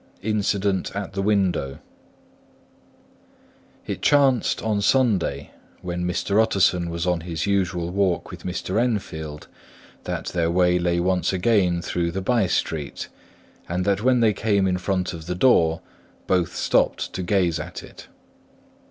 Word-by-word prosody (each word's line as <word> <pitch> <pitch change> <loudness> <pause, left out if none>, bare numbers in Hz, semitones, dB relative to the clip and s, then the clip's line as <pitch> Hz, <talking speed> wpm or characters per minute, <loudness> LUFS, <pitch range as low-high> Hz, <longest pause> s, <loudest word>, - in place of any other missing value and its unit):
INCIDENT 100 -3 0
AT 100 -1 -4
THE 95 - -2
WINDOW 95 -9 0 2.1
It - - -5
chanced 135 -5 +3
on 105 -2 0
Sunday, 110 -5 +1 0.3
when 90 0 -3
Mr. 100 +4 +1
Utterson 90 -5 +2
was 85 0 -3
on 90 -2 0
his 80 -2 -3
usual 95 -3 0
walk 95 -2 0
with - - -9
Mr. 95 +3 -2
Enfield, 80 -10 -3 0.6
that - - -3
their 85 -1 0
way 90 0 +3
lay 85 0 +1
once 90 -1 +1
again 90 -3 +2
through 85 -1 -1
the 90 +3 -3
by 115 -2 +2
street; 75 -4 -2 0.6
and 90 +2 -1
that 100 0 +1
when 125 0 +3
they 110 -2 +4
came 100 -2 +1
in 90 -1 0
front 95 -1 -1
of 80 -1 -9
the 90 - -2
door, 85 -7 +3 0.4
both 90 -2 0
stopped - - +1
to 95 - -3
gaze 90 -3 +1
on 75 - -5
it. - - -11
90 Hz, 145 wpm, -23 LUFS, 85-100 Hz, 2.1 s, they